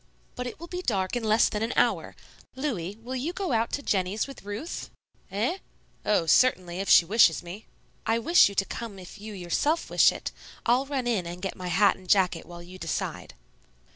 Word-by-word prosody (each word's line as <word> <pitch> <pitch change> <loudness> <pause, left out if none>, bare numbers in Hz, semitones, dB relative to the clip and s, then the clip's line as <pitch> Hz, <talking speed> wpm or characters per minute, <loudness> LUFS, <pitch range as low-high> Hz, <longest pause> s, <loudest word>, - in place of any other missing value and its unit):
"But 250 0 -4
it 245 - -8
will 340 - -7
be 360 +1 -5
dark 195 - -1
in 240 - -2
less 220 +1 +4
than 210 - -3
an 225 +2 -1
hour. - - +1 0.4
Louis, 210 - -3
will 255 +2 -5
you 285 +7 -2
go 380 -4 -3
out 230 -1 +1
to 285 - -2
Jennie's 195 0 0
with 275 - -11
Ruth?" 205 - -6 0.4
"Eh? 235 - -1 0.4
Oh, 205 -5 +2
certainly, 180 -2 +3
if 195 - -3
she 170 - +8
wishes 175 -6 +4
me." 180 +5 -9 0.4
"I 225 - +3
wish 335 - +5
you 200 - -9
to 195 - +2
come 225 -2 -6
if 185 +3 -11
you 215 +1 -7
yourself 195 - -1
wish - - +6
it. - - -6 0.3
I'll 250 +3 +3
run 270 -3 -2
in 215 -8 0
and 175 +1 -6
get 195 +1 -4
my 185 -1 -6
hat 195 +3 +3
and 185 -1 -16
jacket 180 -4 +2
while 175 0 -10
you 185 +2 -12
decide." 165 - -4
210 Hz, 205 wpm, -27 LUFS, 185-250 Hz, 0.4 s, she